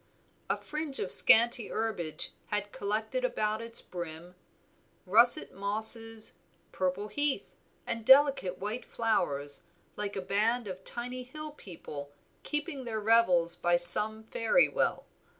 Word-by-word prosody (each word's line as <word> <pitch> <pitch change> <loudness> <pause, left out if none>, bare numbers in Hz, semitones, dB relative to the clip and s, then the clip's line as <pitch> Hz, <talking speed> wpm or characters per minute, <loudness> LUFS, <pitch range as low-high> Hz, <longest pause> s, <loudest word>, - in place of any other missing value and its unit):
A - - -1
fringe 305 -2 -5
of 185 - -4
scanty 235 0 +4
herbage 200 -8 -4 0.2
had 205 0 -4
collected 215 - -4
about 215 - -3
its 230 0 +2
brim, 170 0 -9 0.7
russet 230 +6 +5
mosses, 220 +2 +2 0.4
purple 185 +2 -4
heath, 290 +3 -2 0.3
and 230 -1 -4
delicate 265 -8 +3
white 210 +6 -6
flowers, 145 -10 -2 0.3
like 205 -1 -6
a 195 - -4
band 215 +5 -2
of 190 0 -9
tiny 250 +3 -2
hill 305 +5 -9
people 155 - -11 0.3
keeping 295 -2 -5
their 225 -3 -5
revels 205 -6 +2
by 175 0 0
some 210 +5 +8
fairy 230 - 0
well. - - -3
220 Hz, 125 wpm, -28 LUFS, 185-240 Hz, 0.7 s, some